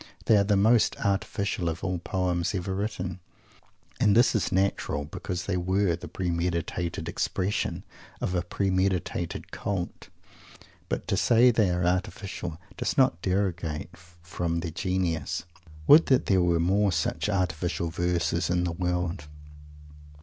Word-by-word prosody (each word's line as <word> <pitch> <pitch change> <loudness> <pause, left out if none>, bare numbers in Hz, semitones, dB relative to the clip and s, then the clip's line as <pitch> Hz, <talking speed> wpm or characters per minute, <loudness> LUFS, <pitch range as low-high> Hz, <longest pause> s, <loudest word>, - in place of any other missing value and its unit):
They 110 - +5
are 100 - +5
the 100 0 +2
most 110 +3 +4
artificial 100 -2 -1
of 80 0 -5
all 90 -1 -1
poems 90 0 -1
ever 95 +1 -2
written. 95 -3 -3 0.8
And 105 +1 +4
this 120 - +5
is 110 - 0
natural, 95 -6 0
because 90 +3 -5
they 95 -2 -1
were 95 0 +1
the 90 +1 -9
premeditated 85 0 -2
expression 95 +2 -1 0.4
of 90 - -2
a 90 - +1
premeditated 95 -2 -1
cult. 95 -4 -4 0.8
But - - -3
to - - +1
say 120 +1 +5
they 110 -4 +2
are 90 0 0
artificial 90 -2 -2 0.2
does - - -2
not 125 -11 +3
derogate 90 -4 -2
from 85 -1 -4
their 85 -1 -4
genius. 85 -3 -1 0.4
Would 155 - +8
that 130 - +3
there 95 -2 +3
were 85 -1 +2
more 100 +4 +2
such 95 - -1
"artificial" 90 -3 -1
verses 85 -1 0
in 90 0 +1
the 90 - -1
world! 90 -2 -2
90 Hz, 140 wpm, -27 LUFS, 85-100 Hz, 0.8 s, Would